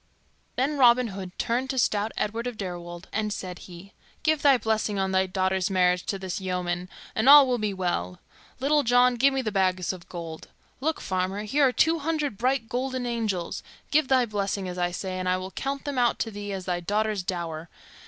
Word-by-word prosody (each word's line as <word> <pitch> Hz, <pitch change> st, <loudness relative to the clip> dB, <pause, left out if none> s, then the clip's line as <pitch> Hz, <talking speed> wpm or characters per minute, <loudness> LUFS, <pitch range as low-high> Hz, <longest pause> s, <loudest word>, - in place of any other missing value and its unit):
Then 280 Hz, +3 st, 0 dB
Robin 245 Hz, -1 st, +5 dB
Hood 190 Hz, -2 st, -8 dB
turned 250 Hz, +3 st, -1 dB
to 265 Hz, -, -2 dB
stout 215 Hz, -2 st, +1 dB
Edward 225 Hz, +3 st, -2 dB
of 245 Hz, -3 st, -5 dB
Deirwold, 175 Hz, -2 st, -6 dB
and 215 Hz, -1 st, -1 dB
said 185 Hz, -3 st, -5 dB
he, 180 Hz, +3 st, -12 dB, 0.3 s
"Give 310 Hz, -1 st, +2 dB
thy 280 Hz, -3 st, +6 dB
blessing 220 Hz, -3 st, -1 dB
on 190 Hz, 0 st, 0 dB
thy 190 Hz, 0 st, +2 dB
daughter's 190 Hz, 0 st, 0 dB
marriage 180 Hz, -1 st, +2 dB
to 195 Hz, -, -1 dB
this 190 Hz, 0 st, -5 dB
yeoman, 180 Hz, -1 st, -2 dB, 0.2 s
and 220 Hz, +5 st, +3 dB
all 290 Hz, -1 st, +10 dB
will 250 Hz, -2 st, 0 dB
be 210 Hz, -1 st, -1 dB
well. 175 Hz, -, -2 dB, 0.4 s
Little 295 Hz, +3 st, +3 dB
John, 245 Hz, 0 st, +4 dB
give 265 Hz, +3 st, +4 dB
me 270 Hz, -1 st, -1 dB
the 215 Hz, -, -2 dB
bags 185 Hz, -2 st, +1 dB
of 180 Hz, -2 st, -12 dB
gold. 165 Hz, -2 st, -7 dB, 0.3 s
Look, 315 Hz, +4 st, -1 dB
farmer. 190 Hz, +2 st, -2 dB
Here 275 Hz, +6 st, +3 dB
are -, -, +1 dB
two 325 Hz, +5 st, +2 dB
hundred 300 Hz, -5 st, -1 dB
bright 255 Hz, -1 st, +1 dB
golden 255 Hz, +1 st, -2 dB
angels; 220 Hz, -7 st, -2 dB, 0.3 s
give 300 Hz, -1 st, +3 dB
thy 255 Hz, -2 st, +4 dB
blessing, 200 Hz, -3 st, -2 dB
as 180 Hz, 0 st, -5 dB
I 175 Hz, 0 st, +1 dB
say, 185 Hz, +1 st, -4 dB
and 185 Hz, 0 st, -1 dB
I 185 Hz, -, +2 dB
will 185 Hz, +1 st, -6 dB
count 275 Hz, +5 st, -4 dB
them 285 Hz, -3 st, -2 dB
out 240 Hz, -1 st, +2 dB
to 225 Hz, -, -2 dB
thee 205 Hz, 0 st, -6 dB
as 190 Hz, -2 st, -5 dB
thy 180 Hz, -1 st, -1 dB
daughter's 210 Hz, +3 st, 0 dB
dower. 170 Hz, -3 st, -4 dB
205 Hz, 205 wpm, -26 LUFS, 185-250 Hz, 0.4 s, all